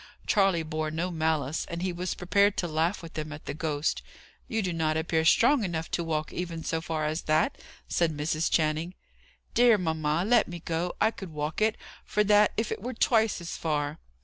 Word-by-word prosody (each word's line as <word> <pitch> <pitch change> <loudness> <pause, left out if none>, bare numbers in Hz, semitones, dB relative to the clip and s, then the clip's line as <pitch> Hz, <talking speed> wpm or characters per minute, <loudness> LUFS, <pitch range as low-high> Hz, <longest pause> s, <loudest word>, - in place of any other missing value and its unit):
Charley 195 -5 +3
bore 155 0 -2
no 165 +4 -2
malice, 160 -3 -1
and 170 +1 -4
he 185 -1 -1
was 180 +1 -3
prepared 200 +3 +2
to 175 - 0
laugh 165 +4 0
with 165 - -9
them 155 -1 -4
at 150 +1 -9
the - - -4
ghost. 150 0 -1 0.5
"You 225 -1 -1
do 180 -2 -1
not 160 -1 0
appear 160 0 +1
strong 240 - +5
enough 165 -4 -3
to 170 - 0
walk 155 -2 -2
even 170 -2 -4
so 165 0 -1
far 160 -1 -2
as 155 +2 -1
that," 155 - +2 0.3
said 160 -3 0
Mrs. 155 +2 0
Channing. 160 +3 0 0.6
"Dear 240 -2 +6
mamma, 160 -1 0
let 235 +1 +4
me 175 - -6
go! 170 +2 -2
I 220 - +3
could 195 -5 -8
walk 150 +3 -4
it, 215 0 +2 0.3
for 210 - +1
that, 210 0 +5
if 220 0 -1
it - - -3
were 250 +3 -5
twice 225 -2 +2
as 170 - -5
far." 150 -1 -2
165 Hz, 200 wpm, -28 LUFS, 155-195 Hz, 0.6 s, Dear